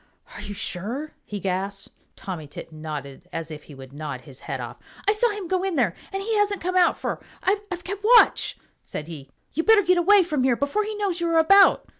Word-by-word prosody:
"Are - - -8
you 205 - -6
sure?" 235 - -4
he 205 - -5
gasped. 195 +1 -3 0.2
Tommy 175 -6 -6
Tit 155 +2 -10
nodded 155 0 -7
as 165 -1 -5
if 150 -1 -9
he 145 - -12
would 135 0 -12
nod 145 -3 -5
his 135 -4 -13
head - - -5
off. - - -7 0.3
"I - - +6
saw 435 +3 +2
him 410 -4 -5
go 370 +1 0
in, 380 -5 -1
and 220 -10 +2 0.2
he 395 +3 -1
hasn't 410 -1 +2
come 365 +2 -2
out, 360 -1 +4
for - - -3 0.2
I've 390 -2 -1
kept 395 +2 -5
watch," 470 +2 +5 0.2
said 150 - -6
he. 145 -5 -9 0.2
"You 325 - +1
better 425 +3 +5
get 360 0 +3
away 395 +3 +6
from 305 -5 -1
here 255 -2 +3
before 285 - 0
he 430 0 -4
knows 390 -4 -1
you 340 - +1
are 330 - +3
about." 390 +5 +6
310 Hz, 220 wpm, -24 LUFS, -, 0.3 s, I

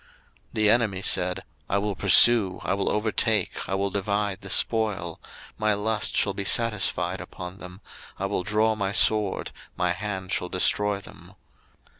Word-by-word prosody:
02:015:009 - - -29 0.4
The 110 -1 +2
enemy 110 -5 0
said, 90 -1 +1 0.3
I 100 - 0
will 100 0 -2
pursue, 100 0 +5
I - - -1
will 100 0 -1
overtake, 105 -2 0
I 95 - -1
will 100 0 -2
divide 100 0 -2
the 100 - -10
spoil; 100 -5 0 0.4
my 110 -1 +1
lust 105 +1 -1
shall 100 - +1
be 100 - -4
satisfied 110 0 +1
upon 90 +1 -10
them; 90 +2 -12 0.4
I 95 - -4
will 100 -1 -2
draw 105 +3 +1
my 100 -2 -3
sword, 105 -2 +2 0.3
my 90 0 0
hand 95 -2 -6
shall 90 - -2
destroy 100 +2 +1
them. - - -15
100 Hz, 160 wpm, -24 LUFS, 95-105 Hz, 0.4 s, pursue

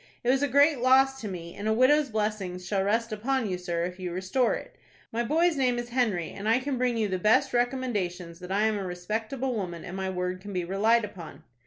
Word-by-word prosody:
It 245 - +3
was 265 +1 +2
a 285 - +2
great 285 +1 +4
loss 265 +2 +4
to 215 - -4
me, 170 -3 -7
and 205 - -5
a 220 - +3
widow's 275 +5 +4
blessings 210 -5 -2
shall 195 +2 0
rest 225 +3 0
upon 235 +3 -1
you, 180 -2 -3
sir, 170 -2 -2
if 180 +1 -5
you 180 -1 -4
restore 190 +8 +1
it. - - -9 0.4
My 235 +1 -1
boy's 325 +5 +2
name 250 -2 +2
is 240 0 -4
Henry, 225 -9 0
and 205 +2 -4
I 225 - +5
can 260 0 -2
bring 250 -2 +1
you 220 -2 +1
the 185 -2 -2
best 215 +5 +3
recommendations 205 -9 -1
that 180 0 -8
I 200 +2 +2
am 220 -1 +1
a - - -3
respectable 220 +9 -3
woman, 175 -5 -4
and 185 0 -7
my 190 0 -2
word 180 0 -3
can 200 +1 -8
be 180 -2 -1
relied 215 +5 +2
upon." 165 -7 -11
215 Hz, 235 wpm, -27 LUFS, 185-250 Hz, 0.4 s, I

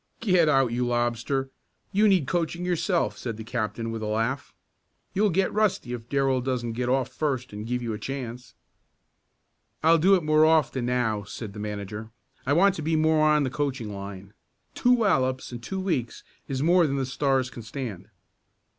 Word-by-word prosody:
"Get 180 -7 +3
out, 135 -4 +3
you 120 +1 0
lobster, 120 +3 -1 0.4
you 210 +2 +4
need 190 -8 +4
coaching 170 +2 -1
yourself," 180 0 0
said 115 -3 -4
the 110 - -6
captain 115 0 -3
with 115 -1 -4
a 110 - -3
laugh. 115 +5 -1 0.6
"You'll 210 +2 +3
get 190 +2 +1
rusty 205 - +1
if 120 -1 -7
Darrell 135 -2 +1
doesn't 125 -2 -2
get 125 +1 -2
off 130 0 +1
first 130 -6 -2
and 105 +2 -6
give 125 0 -2
you 115 -2 -2
a 105 - -5
chance." 125 0 -6 1.3
"I'll 165 +1 +5
do 190 +5 +6
it 180 - 0
more 155 0 +4
often 155 -6 +3
now," 120 -4 0
said 100 +1 -8
the 105 - -8
manager. 105 +1 -5 0.4
"I 140 - +3
want 195 +5 +5
to - - -4
be 160 +1 0
more 155 0 +3
on 150 -1 +4
the 130 - -2
coaching 130 -7 -2
line. 100 0 -8 0.4
Two 245 - +3
wallops 130 - +1
in 120 - -6
two 190 +11 -5
weeks 165 -11 -2 0.2
is 135 0 -2
more 175 0 +5
than 140 - -1
the 135 -1 0
Stars 135 -1 0
can 120 - -8
stand." 110 -4 -6
130 Hz, 185 wpm, -26 LUFS, 115-160 Hz, 1.3 s, do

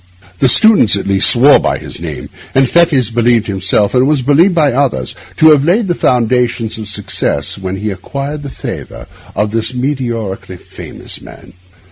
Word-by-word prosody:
The - - +3
students, 205 - +5
at 100 - -4
least, 100 -1 +4
swore 135 +4 +5
by - - -1
his - - -9
name, - - -7 0.3
and 135 0 +3
Fettes 145 -8 +2
believed 120 -1 +1
himself, 95 +1 0
and 130 +1 +2
was 145 -3 0
believed 165 +8 +3
by 150 -4 +2
others, 125 - -1 0.2
to 160 0 +6
have 145 -2 +3
laid 195 +7 +1
the 175 - 0
foundations 120 -4 -1
of 110 - -7
success 100 -7 -3
when 95 -1 -5
he 105 +2 -4
had 95 -2 -7
acquired 140 +7 -6
the 145 - -7
favour 65 - -8 0.3
of 105 0 -1
this 115 +2 -1
meteorically 120 -8 -4
famous - - -9
man. - - -15
125 Hz, 175 wpm, -13 LUFS, 105-145 Hz, 0.3 s, to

